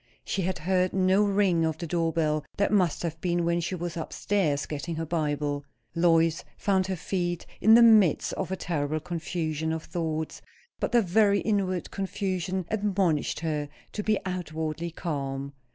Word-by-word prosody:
She 195 - -1
had 185 0 -1
heard 185 +3 +1
no 190 +2 +3
ring 195 -4 +2
of 160 -1 0
the 170 - -5
door 165 0 0
bell; 155 -2 0
that 200 - +2
must 185 -7 +2
have 165 -1 -4
been 175 -1 0
when 170 0 +1
she 180 +3 -2
was 175 -1 -4
up 165 - -5
stairs 160 -9 0
getting 155 +3 -4
her 165 +1 -3
Bible. 145 -3 -1 0.3
Lois 165 -1 +3
found 190 -2 +1
her 190 - -1
feet, 175 -1 -2 0.2
in 220 +3 +7
the 235 - +8
midst 215 -8 +5
of 190 -1 -3
a - - 0
terrible 155 -4 -2
confusion 160 -2 -3
of 160 0 -3
thoughts; 160 -2 -3 0.4
but - - -1
the 240 -2 +4
very 200 +2 +3
inward 190 -4 -1
confusion 190 -2 -2
admonished 195 -9 0
her 150 -3 -2 0.2
to 210 - -3
be 215 0 +2
outwardly 160 -2 -3
calm. 140 -4 -4
170 Hz, 170 wpm, -27 LUFS, 160-190 Hz, 0.4 s, the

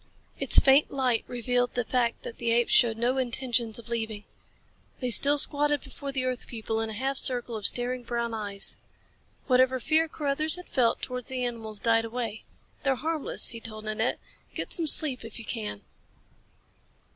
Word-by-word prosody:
Its - - +7
faint 275 +2 +5
light 255 -4 0
revealed 245 0 -1
the 245 -1 -1
fact 240 -2 -1
that 230 - -9
the 235 - -2
apes 235 +1 +2
showed 230 -3 +4
no 245 +3 0
intentions 240 -3 -1
of 235 - -9
leaving. 220 -3 -4 0.8
They 250 -2 -2
still 280 +7 +7
squatted 290 0 +3
before 280 -1 -7
the 260 -1 -3
earth 255 -1 -4
people, 225 -1 -4
in 225 - -3
a - - -6
half 265 +5 -2
circle 245 -3 +2
of 210 -2 +1
staring 250 +1 -1
brown 235 -1 -4
eyes. 205 -2 -1 0.7
Whatever 255 0 +2
fear 315 +5 +1
Carruthers 305 +1 -1
had 360 0 -11
felt 245 -4 0
towards 250 -2 -5
the 255 -1 -2
animals 220 -3 -5
died 225 0 +2
away. 225 -2 -5 0.4
"They're 270 -1 0
harmless," 315 +2 0
he 230 - -9
told 215 -1 -8
Nanette. 215 +2 -1 0.4
"Get - - -4
some 335 -3 +1
sleep 280 -5 +5
if 225 -1 -9
you 230 - -9
can." 210 - -5
245 Hz, 175 wpm, -27 LUFS, 225-265 Hz, 0.8 s, Its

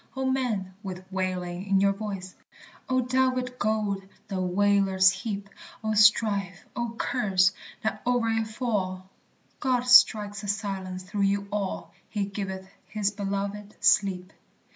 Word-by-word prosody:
O 265 0 -2
men, 240 -8 -1
with 185 -2 -7
wailing 185 0 -3
in 195 -1 +3
your 200 0 +3
voice! 195 -3 -6 0.6
O 255 0 +3
delved 255 0 0
gold 210 -2 0 0.3
the 190 -2 -2
wailers 190 0 +4
heap! 200 +1 -5 0.4
O 220 0 0
strife, 205 -3 +3
O 235 -1 -3
curse, 190 -8 +2 0.3
that 220 - -2
o'er 245 -2 +2
it 225 0 0
fall! 200 -5 -2 0.5
God 255 -3 +1
strikes 215 -5 +6
a 205 - -7
silence 190 -2 -3
through 200 +2 -4
you 200 0 -1
all, 200 -2 -3 0.2
"He 205 -2 -1
giveth 190 -1 -5 0.2
his 210 -2 -1
beloved 200 +1 -4
sleep." 185 -2 +2
200 Hz, 135 wpm, -27 LUFS, 190-220 Hz, 0.6 s, strikes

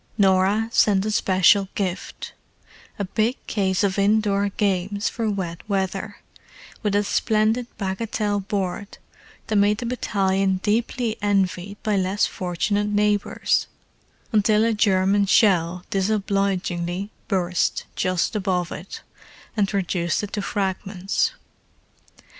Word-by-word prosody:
Norah 195 +2 +3
sent 200 -3 +3
a 215 - -1
special 190 0 +4
gift—a 195 +1 -7
big 220 +6 0
case 190 -2 0
of 200 0 +1
indoor 205 0 +2
games 200 0 -1
for 230 -2 -2
wet 180 -4 -3
weather, 195 +1 -2 0.6
with 210 -2 0
a 205 - +3
splendid 220 +3 +1
bagatelle 205 +1 -1
board 195 0 -3 0.5
that 215 - -2
made 205 +1 +3
the 240 - -5
battalion 195 -5 0
deeply 230 +1 0
envied 200 -1 0
by 210 -3 +1
less 190 +2 +1
fortunate 205 +3 -1
neighbours: 210 0 +1 0.6
until 215 0 +3
a 230 - +2
German 200 -1 +2
shell 180 -4 +3
disobligingly 195 -2 -1 0.2
burst 180 -3 0
just 185 +4 0
above 185 -4 -1
it, 190 - -8 0.5
and 205 -3 +1
reduced 180 -3 -1
it 205 - -6
to 210 - -1
fragments. 195 -1 -1
200 Hz, 115 wpm, -23 LUFS, 190-210 Hz, 0.6 s, special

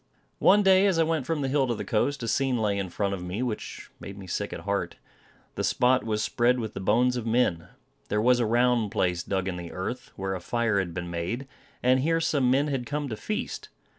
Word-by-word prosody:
One 205 +2 +5
day 190 +1 +5
as 190 -4 +2
I 165 - +4
went 160 -4 -1
from 160 -3 -1
the 135 - 0
hill 135 0 +2
to 120 - 0
the - - -5
coast, 130 +4 0
a - - -3
scene 130 +2 +1
lay 105 -3 0
in 95 -2 -3
front 100 +2 -1
of 95 - -4
me 90 +7 -3
which 120 -4 -5
made 100 0 -9
me 95 - -9
sick 90 - -3
at - - -6
heart. - - -2 0.6
The - - -3
spot 125 +1 +3
was 105 -1 -1
spread 120 +4 +2
with 110 -2 -4
the - - -5
bones 120 +6 +2
of 115 -1 -4
men. 105 -8 +1 0.4
There 105 - +1
was 125 +3 +4
a 120 - +1
round 120 -1 +2
place 90 -5 0
dug 95 +1 -2
in 90 -2 -3
the 85 -1 -7
earth, 110 +7 -5
where 95 0 -3
a 95 - -5
fire 115 0 0
had 85 -4 -3
been 85 -1 -4
made, 90 +11 -3 0.4
and 130 +1 +4
here 165 +5 +1
some 145 -6 +1
men 135 +3 +3
had 135 -4 -2
come 145 -1 -3
to 110 - -3
feast. 210 - -4
120 Hz, 240 wpm, -27 LUFS, 100-130 Hz, 0.6 s, One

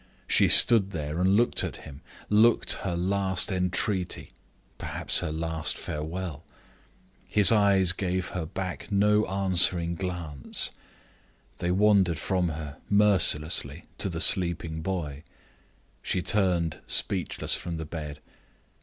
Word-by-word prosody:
She - - +3
stood 110 -5 +7
there 75 -3 -6
and 95 +2 +2
looked 120 +1 +2
at - - -6
him; 70 +1 -12 0.3
looked 110 +3 +3
her 95 -3 -4
last 95 +2 -2
entreaty 90 0 -2 0.5
perhaps - - -1
her 75 - -4
last 80 0 -3
farewell. 80 0 -7 0.8
His 105 0 +6
eyes 100 -4 +3
gave 90 -1 -4
her 90 -3 -6
back 95 +2 -7
no 105 +1 +1
answering 90 -3 +3
glance: 85 -5 -2 0.9
they 90 - -3
wandered 95 -2 +2
from 90 -3 -2
her 75 -2 -8
mercilessly 90 -7 +2 0.2
to 100 - -1
the 85 -2 -5
sleeping 85 -4 +2
boy. 80 -6 -5 0.8
She 90 - -3
turned 90 -6 0
speechless - - 0
from 85 -2 -4
the 80 - -7
bed. 75 -1 -8
90 Hz, 120 wpm, -25 LUFS, 80-95 Hz, 0.9 s, stood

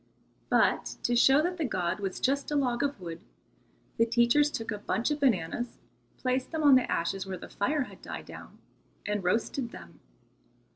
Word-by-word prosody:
But - - +2
to 240 - +1
show 270 +5 +5
that 360 +1 -1
the 330 - -1
god 185 -8 -1
was 195 -2 -3
just 280 +2 0
a 295 - -1
log 250 -3 +1
of 285 -5 -1
wood, 170 -2 -7 0.8
the 230 - +4
teachers 235 +6 +4
took 225 -6 -4
a 210 - -4
bunch 230 +6 -1
of 295 - -1
bananas, 240 - 0 0.4
placed 255 0 -1
them 320 -1 -2
on 285 -2 +7
the 255 -1 +4
ashes 190 +3 -1
where 190 -1 -4
the - - -10
fire 280 +8 0
had - - -13
died - - -7
down, - - -11 0.5
and 205 -1 -1
roasted 230 +6 0
them. - - -12
240 Hz, 185 wpm, -29 LUFS, 200-280 Hz, 0.8 s, on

